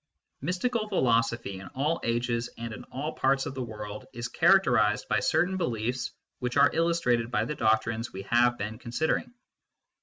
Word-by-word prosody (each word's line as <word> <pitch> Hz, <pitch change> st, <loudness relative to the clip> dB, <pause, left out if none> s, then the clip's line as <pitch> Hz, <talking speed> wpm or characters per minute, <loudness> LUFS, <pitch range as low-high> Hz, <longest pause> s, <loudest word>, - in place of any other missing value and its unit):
Mystical 215 Hz, -, -1 dB
philosophy, 115 Hz, -, +1 dB
in 95 Hz, -, -9 dB
all 150 Hz, +5 st, 0 dB
ages 120 Hz, 0 st, 0 dB
and 115 Hz, -1 st, -5 dB
in -, -, -9 dB
all 150 Hz, +4 st, -4 dB
parts 135 Hz, 0 st, +1 dB
of -, -, -4 dB
the 135 Hz, -, -4 dB
world, 105 Hz, -3 st, -7 dB
is 120 Hz, +1 st, -4 dB
characterised 120 Hz, -, +4 dB
by -, -, +2 dB
certain 185 Hz, +3 st, +1 dB
beliefs 125 Hz, -, -1 dB, 0.3 s
which 125 Hz, +2 st, -2 dB
are 140 Hz, -1 st, +6 dB
illus 165 Hz, +1 st, +2 dB
trated 120 Hz, -4 st, +1 dB
by 105 Hz, -2 st, 0 dB
the 150 Hz, -, -3 dB
doctrines 110 Hz, -1 st, +1 dB
we 95 Hz, -, -7 dB
have 120 Hz, +3 st, +3 dB
been 110 Hz, +1 st, -5 dB
considering. 130 Hz, -, -1 dB
120 Hz, 170 wpm, -28 LUFS, 115-145 Hz, 0.3 s, are